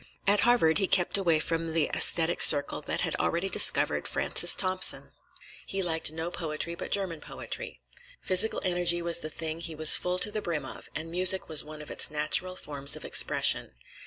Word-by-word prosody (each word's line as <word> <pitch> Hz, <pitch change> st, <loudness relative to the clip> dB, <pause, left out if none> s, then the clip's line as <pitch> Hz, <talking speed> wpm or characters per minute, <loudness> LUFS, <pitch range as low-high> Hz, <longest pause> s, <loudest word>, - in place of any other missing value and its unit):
At 205 Hz, +1 st, +2 dB
Harvard 230 Hz, -10 st, +1 dB
he 195 Hz, -, -1 dB
kept 180 Hz, -2 st, 0 dB
away 170 Hz, -5 st, +1 dB
from 165 Hz, +1 st, -4 dB
the 160 Hz, -2 st, 0 dB
aesthetic 170 Hz, 0 st, +1 dB
circle 145 Hz, -2 st, +6 dB
that -, -, -3 dB
had -, -, -2 dB
already 175 Hz, +3 st, -3 dB
discovered -, -, +4 dB
Francis -, -, +3 dB
Thompson. 185 Hz, -1 st, +1 dB, 0.6 s
He 195 Hz, 0 st, -5 dB
liked 160 Hz, -3 st, 0 dB
no 160 Hz, +2 st, -7 dB
poetry 165 Hz, 0 st, -6 dB
but 170 Hz, -, -9 dB
German 185 Hz, -6 st, -4 dB
poetry. -, -, -9 dB, 0.4 s
Physical 185 Hz, +4 st, +1 dB
energy 175 Hz, -1 st, +1 dB
was 170 Hz, 0 st, +2 dB
the 155 Hz, -, -8 dB
thing 160 Hz, +1 st, -7 dB
he 165 Hz, -1 st, -7 dB
was 155 Hz, 0 st, +5 dB
full 180 Hz, 0 st, -4 dB
to 210 Hz, -, +2 dB
the 215 Hz, 0 st, -4 dB
brim 160 Hz, -7 st, -6 dB
of, -, -, -11 dB
and 160 Hz, +1 st, -5 dB
music 185 Hz, +2 st, +1 dB
was 155 Hz, -2 st, 0 dB
one 155 Hz, 0 st, -11 dB
of -, -, -13 dB
its -, -, 0 dB
natural 155 Hz, +5 st, -1 dB
forms 140 Hz, -4 st, -1 dB
of -, -, -10 dB
expression. -, -, +1 dB
170 Hz, 190 wpm, -26 LUFS, 155-185 Hz, 0.6 s, circle